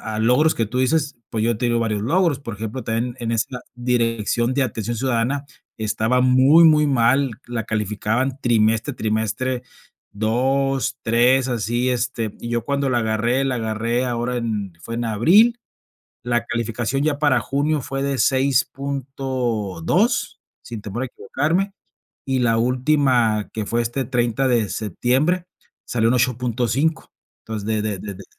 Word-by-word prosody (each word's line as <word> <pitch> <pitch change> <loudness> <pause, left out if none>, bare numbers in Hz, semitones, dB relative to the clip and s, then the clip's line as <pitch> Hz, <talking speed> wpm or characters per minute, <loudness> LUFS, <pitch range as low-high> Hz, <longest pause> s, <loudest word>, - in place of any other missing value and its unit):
a 105 - -2
logros 125 +8 +3
que 115 - 0
tú 125 +4 -3
dices, 150 +2 +1
pues 110 -1 -2
yo 115 -1 +1
te 120 - 0
digo 120 0 +1
varios 110 -3 -1
logros. 160 - +1
Por 115 -6 -6
ejemplo, 110 +4 -5
también 115 +2 -2
en 115 -1 -2
esa 115 +2 -1 0.2
dirección 120 -1 0
de 140 +1 +2
atención 115 -2 -3
ciudadana 130 +3 0 0.3
estaba 110 +3 0
muy, 130 +6 +6
muy 150 -1 +5
mal, 135 +1 +3 0.2
la 120 -2 -3
calificaban 110 +5 -1
trimestre 115 +2 +2
a 125 - -10
trimestre, 110 +4 -1 0.5
2, 135 +5 0
3, 125 +3 +3
así, 120 +1 -1
este, 120 -3 -1
y 120 - -6
yo 120 -1 -1
cuando 140 +2 -1
la 120 - +2
agarré, 115 +4 0
la 130 -2 0
agarré 115 +2 -1
ahora 120 0 -2
en 105 -6 -3
fue 115 +7 -8
en 120 0 -2
abril, 190 - +4 0.7
la 120 -1 0
calificación 120 +3 -2
ya 150 -1 0
para 145 -5 +3
junio 145 +4 0
fue 135 +2 -4
de 140 -2 -1
6.2, 130 - 0 0.2
sin 115 -3 -7
temor 105 +4 -5
a 130 - -1
equivocarme, 165 - -1 0.5
y 135 -1 0
la 115 -2 +2
última 125 -3 +2
que 110 -2 -4
fue 120 +2 0
este 120 +3 -2
30 120 0 0
de 115 -5 +2
septiembre, 130 - 0 0.4
salió 115 -1 +1
en - - +2
8.5 125 +4 0 0.3
Entonces 110 -2 -6
de 110 -1 0
de 105 -3 -2
de 100 +1 -7
de 95 +1 -11
120 Hz, 155 wpm, -21 LUFS, 115-135 Hz, 0.7 s, muy